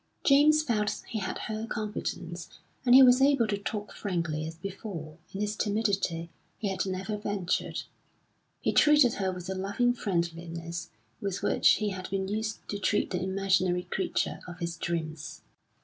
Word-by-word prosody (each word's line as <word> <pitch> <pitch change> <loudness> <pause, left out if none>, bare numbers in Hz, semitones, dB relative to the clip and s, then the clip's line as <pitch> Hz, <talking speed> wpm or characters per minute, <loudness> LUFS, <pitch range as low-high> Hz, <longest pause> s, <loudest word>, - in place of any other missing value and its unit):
James 300 +2 +6
felt 215 -7 0
he 220 - -2
had 190 - -3
her 220 +1 -4
confidence, 180 -6 -4 0.3
and 245 -1 +6
he 265 - +11
was 250 0 +7
able 275 -3 +5
to 210 -1 0
talk 205 0 -4
frankly 165 -5 -2
as 160 - -7
before, 170 -3 -7
in 195 - -4
his 210 0 -1
timidity, 200 -6 0 0.3
he 210 - -2
had 190 0 -1
never 190 +3 -3
ventured. 205 -4 -2 0.8
He - - +1
treated 295 -5 +6
her 190 -1 +1
with 180 -1 -7
the 190 - -3
loving 200 +6 +1
friendliness 170 -4 -3 0.3
with 195 -2 -3
which - - +5
he 210 -1 0
had 185 -1 -5
been 190 0 -1
used 215 +2 -3
to 205 - -3
treat 205 +1 +1
the 180 - -1
imaginary 190 -1 +1
creature 190 - -1
of 175 -1 -8
his 170 -1 -3
dreams. 160 -3 -4
195 Hz, 165 wpm, -29 LUFS, 175-215 Hz, 0.8 s, he